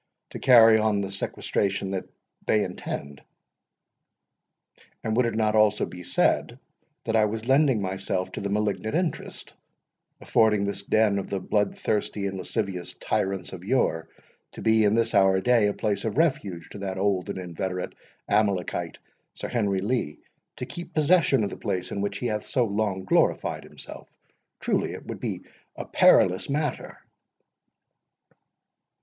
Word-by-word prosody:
—to - - -7
carry 115 -4 +7
on 110 -1 +1
the 100 -1 -4
sequestration 100 0 -2
which 95 -1 -3 0.4
they 105 -1 +3
intend. 70 -6 -6 1.8
And 110 - -1
would 125 0 +3
it 115 - -3
not 110 -1 +1
also 105 -1 +3
be 90 - -10
said, - - +1 0.5
that 115 - -1
I 110 -1 +5
was 110 +2 -4
lending 135 -5 +3
myself 95 -1 -2
to - - -6
the 100 - -3
malignant 105 +1 -1
interest, 175 -1 -3 0.7
affording 105 -2 +2
this 100 - -3
den 105 -2 +2
of 95 - -6
the 100 - -2
blood 105 +2 0
thirsty 105 -1 -1
and 95 -1 -3
lascivious 90 -1 -3
tyrants 95 0 -2
of 90 -1 -8
yore, 80 -8 0 0.4
to - - -9
be 110 0 +4
in 105 +1 +3
this 115 0 +1
our 95 -2 +4
day 115 0 +3
a 105 - 0
place 100 -2 -1
of 110 +2 -3
refuge 100 - 0
to 100 - -8
that 95 -1 -4
old 95 -2 0
and - - -4
inveterate 90 0 -4 0.3
Amalekite, 100 -4 0 0.4
Sir - - -5
Henry 100 -5 0
Lee, 105 -8 -1 0.4
to - - -5
keep 175 - -8
possession 150 -5 +4
of 100 - -2
the - - -7
place 90 -1 -3
in 100 - -3
which 100 - -2
he - - -5
hath 105 -3 -2
so 125 -3 +1
long 100 -3 -2
glorified - - +1
himself? - - -11 0.5
Truly - - 0
it - - -9
would - - -6
be - - -4 0.3
a - - -6
perilous 90 +7 +4
matter." 150 +2 -2
105 Hz, 155 wpm, -26 LUFS, 95-110 Hz, 1.8 s, carry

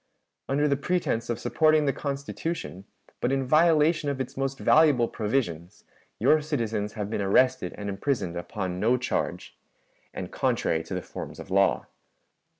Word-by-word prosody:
"Under 145 +2 +2
the 140 - +2
pretense 140 -10 -1
of 120 - -1
supporting 155 -1 +3
the 140 - +1
Constitution, 140 - -4 0.3
but 125 - 0
in 135 -1 0
violation 155 +1 +3
of 140 -2 -3
its 130 - -4
most 135 0 -2
valuable 145 -6 +4
provisions, 105 -8 -3 0.3
your 155 0 +4
citizens 115 -8 -2
have 105 -3 -4
been 110 - -1
arrested 125 +1 +2
and 100 - -5
imprisoned 100 -3 -2
upon 90 0 -4
no 115 +5 +3
charge, 125 - -3 0.6
and - - -6
contrary 80 0 0
to - - -5
the - - -3
forms - - -8
of - - -10
law. 100 0 +3
130 Hz, 150 wpm, -26 LUFS, 100-145 Hz, 0.6 s, valuable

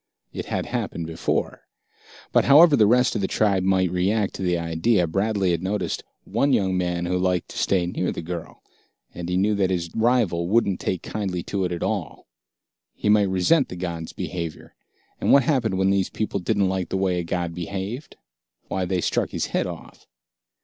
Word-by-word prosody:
It - - -5
had - - -2
happened 85 - -3
before. 80 0 -2 0.6
But, - - +3
however 150 +2 +7
the 110 -5 +5
rest 125 +1 +3
of - - -1
the 95 - 0
tribe 100 -3 +2
might 95 -1 +2
react 100 +3 0
to - - -7
the 90 -2 +1
idea, 85 +4 +1
Bradley 95 +2 0
had 85 -1 -1
noticed 100 +3 -2 0.2
one 130 +7 +1
young 95 -4 +2
man 90 -1 -1
who 90 +1 0
liked 90 -1 0
to - - -6
stay 90 -3 +2
near 90 +1 -2
the - - -6
girl, 85 0 -7 0.5
and 85 0 -6
he 90 - 0
knew 105 +3 +2
that 100 -2 +1
this 85 -3 -2
rival 110 -8 +1
wouldn't 100 -3 +2
take 90 - -2
kindly 95 -5 -3
to 95 -2 -2
it 90 - -3
at 85 - -3
all. - - -3 0.7
He 105 - -1
might 105 -2 +4
resent 95 - +2
the - - -6
god's 85 -2 -5
behavior. 85 -4 -6 0.5
And - - +1
what 140 - +7
happened 120 -8 +1
when 95 +1 +2
these 95 -1 +1
people 110 -2 -2
didn't 100 +1 +1
like 95 -1 -2
the - - -1
way 95 -2 +1
a - - -2
god 85 0 -2
behaved? 100 - -5 0.5
Why, 95 -1 -1
they 90 0 -1
struck - - 0
his - - -2
head - - +1
off. - - -10
95 Hz, 195 wpm, -24 LUFS, 90-105 Hz, 0.7 s, however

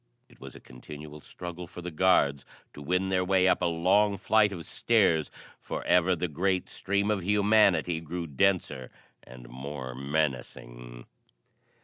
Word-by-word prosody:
It - - -22
was - - -10
a - - -11
continual 75 +4 -11
struggle 90 +1 -8
for 90 0 -10
the 90 - -5
guards 75 -5 +2 0.3
to 75 - -11
win 90 +5 -1
their 95 -1 +1
way 95 0 +2
up 90 - +2
a - - +1
long 95 +5 +2
flight 110 0 +3
of 85 -4 -7
stairs, 95 -9 +1 0.3
for - - -6
ever 90 +1 +3
the 90 +2 -2
great 90 +4 -1
stream 100 +2 -1
of 100 -4 -2
humanity 100 -4 +3
grew 85 +2 -5
denser 80 -4 0 0.3
and 60 -1 -14
more 65 +1 -7
menacing. - - -4
85 Hz, 150 wpm, -28 LUFS, 70-95 Hz, 0.3 s, flight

